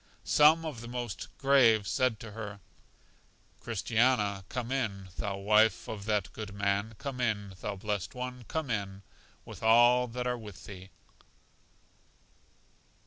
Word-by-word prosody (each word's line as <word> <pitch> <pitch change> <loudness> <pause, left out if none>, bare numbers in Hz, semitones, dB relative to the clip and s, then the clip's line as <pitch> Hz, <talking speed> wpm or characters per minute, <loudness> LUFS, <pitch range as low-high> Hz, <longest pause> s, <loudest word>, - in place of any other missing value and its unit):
Some 155 +2 +5
of 145 -8 -5
the 120 - -8
most 120 -3 -5
grave 120 -7 +4
said 125 -4 +1
to 115 - -8
her, 105 -1 -7 1.0
Christiana, 110 -2 +1
come 125 0 -4
in, 100 -8 -2
thou 100 -1 -3
wife 105 +1 +3
of 105 -2 -6
that 105 -4 -1
good 105 -2 -7
man, 100 +2 -1
come 130 0 -5
in, 105 -5 -1
thou 105 - -3
blest 100 +2 -3
one, 125 0 -5
come 160 -5 -3
in, 100 -2 -3 0.4
with - - -10
all 120 +2 +5
that 125 +1 -4
are 125 -1 -1
with 105 -4 -11
thee. 95 -1 -10
110 Hz, 140 wpm, -30 LUFS, 100-125 Hz, 1.0 s, Some